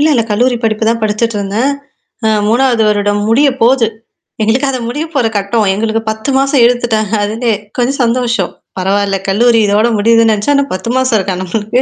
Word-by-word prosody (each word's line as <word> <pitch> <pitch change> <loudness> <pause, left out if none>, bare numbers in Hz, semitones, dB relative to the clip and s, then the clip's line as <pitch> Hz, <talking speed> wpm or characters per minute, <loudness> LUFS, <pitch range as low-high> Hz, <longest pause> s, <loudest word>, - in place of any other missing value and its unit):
இல்ல, 305 - +3
இல்ல 230 - +2
கல்லூரி 245 +4 +1
படிப்பு 220 0 0
தான் 230 0 0
படிச்சுட்டுருந்தேன். 215 +3 -1 0.6
அ 220 - +3 0.2
3வது 240 0 +2
வருடம் 205 0 0
முடிய 275 +6 +4
போது. 235 -1 +3 0.5
எங்களுக்கு 245 +6 +1
அத 255 - -2
முடிய 295 +7 -3
போற 250 -5 +1
கட்டம். 205 +2 0
எங்களுக்கு 220 +2 -1
10 220 +5 -4
மாசம் 275 -1 +2
இழுத்துட்டாங்க 230 -3 0
அதுக்கே. 225 +2 -1 0.2
கொஞ்சம் 260 +3 -1
சந்தோஷம். 235 -5 0 0.3
பரவால்ல. 195 +1 0
கல்லூரி 230 +3 +3
இதோட 210 +3 +2
முடியுதுன்னு 230 +1 +3
நெனச்சா, 215 +7 0
ஆனா 280 - +2
10 210 +5 -4
மாசம் 260 -4 +2
இருக்கா 190 -1 -2
நம்மளுக்கு. 215 +6 -1
225 Hz, 170 wpm, -13 LUFS, 210-245 Hz, 0.6 s, முடிய